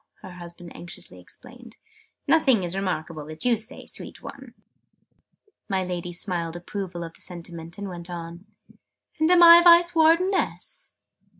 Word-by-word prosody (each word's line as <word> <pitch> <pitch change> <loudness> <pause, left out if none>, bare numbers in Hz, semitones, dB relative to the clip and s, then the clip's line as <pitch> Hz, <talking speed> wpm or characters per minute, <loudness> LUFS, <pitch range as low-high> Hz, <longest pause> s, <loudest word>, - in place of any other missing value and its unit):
her 185 - -9
husband 175 -1 -11
anxiously 165 - -9
explained. 240 - -14 0.5
"Nothing 265 - +3
is 175 +1 -3
remarkable 170 -5 -3
that 155 +5 -7
you 245 -1 +4
say, 220 0 -5
sweet - - -8
one!" - - -11 1.1
My 190 -2 0
Lady 180 -1 -5
smiled 175 -2 -3
approval 175 0 -6
of 165 0 -8
the - - -14
sentiment, 170 -1 -5
and 205 0 -5
went 175 -1 -7
on. 170 +1 -8 0.7
"And 315 +1 +3
am 355 -1 +6
I 340 0 +10
Vice 345 0 +7
Wardeness?" 335 +4 +1
180 Hz, 140 wpm, -24 LUFS, 170-250 Hz, 1.1 s, I